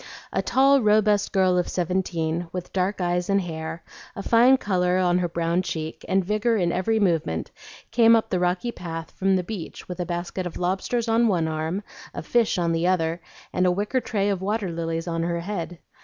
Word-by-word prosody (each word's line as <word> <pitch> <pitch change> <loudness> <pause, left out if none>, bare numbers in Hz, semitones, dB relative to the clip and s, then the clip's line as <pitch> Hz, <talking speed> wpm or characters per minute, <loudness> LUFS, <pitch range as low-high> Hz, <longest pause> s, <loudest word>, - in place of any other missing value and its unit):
A - - +1
tall, 275 +1 +4
robust 210 -1 +3
girl 185 -2 +3
of 175 - -1
seventeen, 175 -2 -1
with 180 -1 -6
dark 190 +2 0
eyes 175 0 -1
and 200 0 +3
hair, 160 -2 -5 0.3
a 200 - -5
fine 245 +5 +5
color 180 -5 +1
on 180 -1 +2
her 175 - 0
brown 170 +1 0
cheek, 160 -3 -5
and 190 -1 +1
vigor 215 +3 +1
in 175 -3 +1
every 205 +5 +1
movement, 165 - 0 0.4
came 230 -1 +6
up 225 - 0
the 185 - +1
rocky 180 +6 0
path 165 -5 -7
from 195 0 +1
the 185 - 0
beach 185 -2 -7
with 180 0 -7
a 180 - -1
basket 175 +1 -3
of 170 - -7
lobsters 195 +6 -1
on 230 +1 +3
one 175 -6 +1
arm, 160 +5 -2 0.3
of - - -5
fish 235 -4 +2
on 170 -1 +1
the 165 +1 +1
other, 170 -2 0 0.3
and 185 0 +2
a - - +4
wicker 210 +7 0
tray 205 -3 -1
of 195 -2 -1
water 205 -1 -1
lilies 165 0 -3
on 165 -1 -1
her 170 0 -1
head. 175 -2 -4
180 Hz, 200 wpm, -24 LUFS, 170-205 Hz, 0.4 s, came